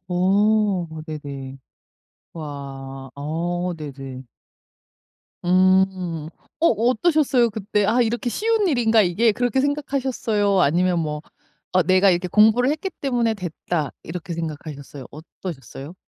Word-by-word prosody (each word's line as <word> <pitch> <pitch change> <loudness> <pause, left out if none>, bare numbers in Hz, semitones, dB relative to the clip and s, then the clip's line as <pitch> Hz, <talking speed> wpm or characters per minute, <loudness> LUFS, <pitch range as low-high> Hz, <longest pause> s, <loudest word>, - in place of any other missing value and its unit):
어 195 +1 +2 0.2
네네. 140 -3 -7 0.8
와. 135 -3 -7
어 175 +5 -2
네네. 135 -4 -8 1.2
음. 185 -3 +2 0.3
어 335 - +4
어떠셨어요 250 - +2
그때? 210 0 -1 0.2
'이렇게 235 +1 -1
쉬운 440 - +1
일인가 230 -6 +4
이게?' 210 +6 +2
그렇게 245 +3 +1
생각하셨어요? 260 -8 0
아니면 175 +3 +2
뭐 150 -2 -3 0.5
'어 185 - +4
내가 185 +2 +4 0.2
공부를 220 +6 +5
했기 315 +6 -2
때문에 240 -5 +1
됐다.' 175 -4 -3
이렇게 170 0 -6
생각하셨어요? 145 -4 -7
어떠셨어요? 150 -2 -9
185 Hz, 245 characters per minute, -22 LUFS, 155-225 Hz, 1.2 s, 공부를